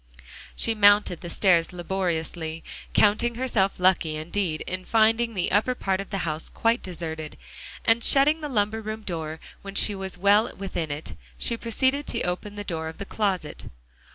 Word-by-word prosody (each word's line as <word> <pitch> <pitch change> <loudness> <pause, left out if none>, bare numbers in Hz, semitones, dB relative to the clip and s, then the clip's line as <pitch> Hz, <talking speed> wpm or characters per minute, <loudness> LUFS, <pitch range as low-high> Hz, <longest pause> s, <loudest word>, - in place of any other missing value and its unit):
So - - -20 0.3
she 230 - +3
mounted 205 -4 +4
the 175 - -7
stairs 170 -2 +3
laboriously, 170 -3 -3 0.3
counting 220 +3 +3
herself 225 -7 0
lucky 180 -4 +3
indeed 160 +1 -2
in 185 0 -3
finding 225 +2 +2
the 180 - 0
upper 220 +6 +2
part 195 -4 -1
of 200 - -10
the 195 - -3
house 155 0 -3
quite 230 +1 +1
deserted, 160 -4 -6 0.5
and 225 +1 +3
shutting 300 +3 +5
the 300 - -4
lumber 220 -2 0
room 215 0 -6
door 160 -4 -4 0.2
when 200 0 -9
she 210 - +3
was 190 -2 -6
well 205 +4 +4
within 185 -5 -4
it, 145 +2 -5 0.2
she 235 - 0
proceeded 260 +5 0
to - - -1
open 180 +4 -3
the 205 - -5
door 160 -5 -4
of 160 - -8
the 200 - -6
closet. 190 -8 -2
195 Hz, 175 wpm, -25 LUFS, 170-220 Hz, 0.5 s, shutting